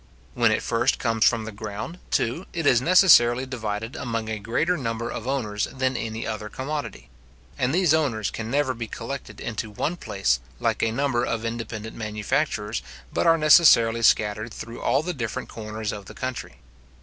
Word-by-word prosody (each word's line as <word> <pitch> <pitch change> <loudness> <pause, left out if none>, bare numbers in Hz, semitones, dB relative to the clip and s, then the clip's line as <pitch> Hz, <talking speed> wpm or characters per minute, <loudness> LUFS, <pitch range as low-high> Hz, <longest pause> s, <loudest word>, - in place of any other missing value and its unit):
When 115 -2 +3
it 110 - 0
first 120 +2 +1
comes 115 -1 +1
from 115 -2 -3
the 110 - -6
ground, 105 - -6
too, 140 +11 -1
it 165 -3 -3
is 125 -4 +5
necessarily 130 -8 +6
divided 110 -2 -4
among 115 -2 -3
a 110 -1 -3
greater 150 - 0
number 115 -5 -3
of 115 - -6
owners 110 -6 -1
than 130 -1 -2
any 110 -1 -4
other 110 -1 -4
commodity; 145 +5 -5 0.5
and 125 0 0
these 175 -1 +3
owners 130 -10 0
can 115 0 -5
never 135 0 +1
be 115 -2 -5
collected 125 +5 -7
into 110 -1 -4
one 155 +11 -2
place, 80 - 0 0.2
like - - 0
a 115 - +2
number 125 0 0
of 115 -2 -2
independent 115 -1 -5
manufacturers, 105 -2 -2 0.3
but - - +1
are 165 0 +6
necessarily 130 -8 +6
scattered 110 0 +2
through 115 +1 -8
all 140 - +2
the 180 +2 -2
different 125 -2 -4
corners 110 -1 -5
of 100 -1 -7
the - - -11
country. 130 -1 -5
115 Hz, 175 wpm, -25 LUFS, 110-135 Hz, 0.5 s, necessarily